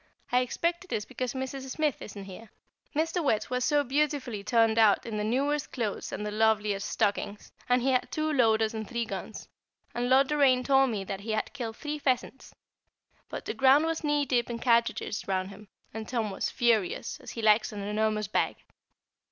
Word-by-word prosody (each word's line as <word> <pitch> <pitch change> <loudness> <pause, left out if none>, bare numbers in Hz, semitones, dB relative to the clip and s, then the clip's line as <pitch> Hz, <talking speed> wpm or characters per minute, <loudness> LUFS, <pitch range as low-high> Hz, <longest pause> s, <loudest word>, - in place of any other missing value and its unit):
I 250 - +4
expect 340 +8 -1
it 370 - -17
is 210 - -1
because 255 +1 -4
Mrs. 265 0 -5
Smith 300 +1 -1
isn't 200 -1 -8
here. 195 +3 -11 0.5
Mr. 325 +3 0
Wertz 220 -5 0
was 250 0 0
so 290 +2 +3
beautifully 270 -5 -1
turned 225 +1 +3
out 215 -3 +4
in 220 -2 -4
the 210 - -1
newest 275 +6 0
clothes 225 -6 -3
and 210 - -4
the 210 - -3
loveliest 210 -2 +1
stockings, 205 -1 -1 0.2
and 250 0 +3
he 265 - +2
had 255 - 0
two 310 0 -1
loaders 225 -4 +3
and 220 -2 -5
three 235 -1 -2
guns, - - -7 0.5
and 245 +1 -1
Lord 265 +1 +5
Doraine 275 -4 +4
told 270 0 +4
me 210 -4 -2
that 195 0 -5
he 215 +2 -4
had 215 - -2
killed 230 -5 -5
three 300 0 -4
pheasants, 265 -1 -2 0.7
but - - -6
the - - -3
ground 270 +3 +5
was 325 0 -2
knee 295 -1 +1
deep 245 -2 +1
in 235 - -3
cartridges 235 -3 +1
round 190 0 -1
him, 205 +1 -13 0.3
and 220 0 -6
Tom 230 -4 -1
was 190 - -2
furious, 225 -7 0
as - - -11
he 230 - -6
likes 215 0 +4
an 205 -1 -6
enormous 215 0 0
bag. 205 - 0
235 Hz, 195 wpm, -28 LUFS, 215-270 Hz, 0.7 s, Lord